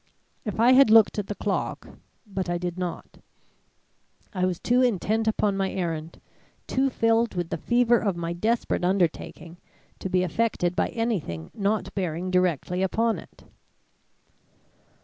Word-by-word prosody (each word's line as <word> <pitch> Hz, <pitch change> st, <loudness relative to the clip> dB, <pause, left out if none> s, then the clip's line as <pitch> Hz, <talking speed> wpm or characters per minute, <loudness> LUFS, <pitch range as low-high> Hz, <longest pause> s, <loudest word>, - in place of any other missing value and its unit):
If 210 Hz, -1 st, -4 dB
I 240 Hz, +3 st, +6 dB
had 265 Hz, -2 st, +7 dB
looked 220 Hz, -1 st, +6 dB
at 200 Hz, -, -4 dB
the 205 Hz, -, -4 dB
clock 200 Hz, -1 st, -3 dB, 0.4 s
but 190 Hz, -3 st, -4 dB
I 175 Hz, -, 0 dB
did 175 Hz, 0 st, -4 dB
not; 180 Hz, -2 st, -6 dB, 1.1 s
I 185 Hz, -2 st, 0 dB
was 180 Hz, -2 st, -2 dB
too 245 Hz, +1 st, +2 dB
intent 220 Hz, -1 st, +1 dB
upon 210 Hz, -2 st, +1 dB
my 195 Hz, -1 st, -1 dB
errand, 165 Hz, -3 st, -4 dB, 0.5 s
too 270 Hz, +1 st, +1 dB
filled 230 Hz, -3 st, +1 dB
with 175 Hz, -2 st, -3 dB
the 165 Hz, -, -1 dB
fever 240 Hz, +2 st, +3 dB
of 200 Hz, -5 st, -1 dB
my 170 Hz, 0 st, -3 dB
desperate 220 Hz, +3 st, -1 dB
undertaking, 175 Hz, -2 st, -1 dB, 0.4 s
to 190 Hz, -, -4 dB
be 185 Hz, 0 st, +2 dB
affected 180 Hz, -1 st, 0 dB
by -, -, +1 dB
anything 180 Hz, -, -3 dB
not 205 Hz, +1 st, -1 dB
bearing 180 Hz, -1 st, -3 dB
directly 180 Hz, 0 st, +1 dB
upon 225 Hz, +4 st, +1 dB
it. -, -, -16 dB
195 Hz, 150 wpm, -25 LUFS, 175-225 Hz, 1.1 s, had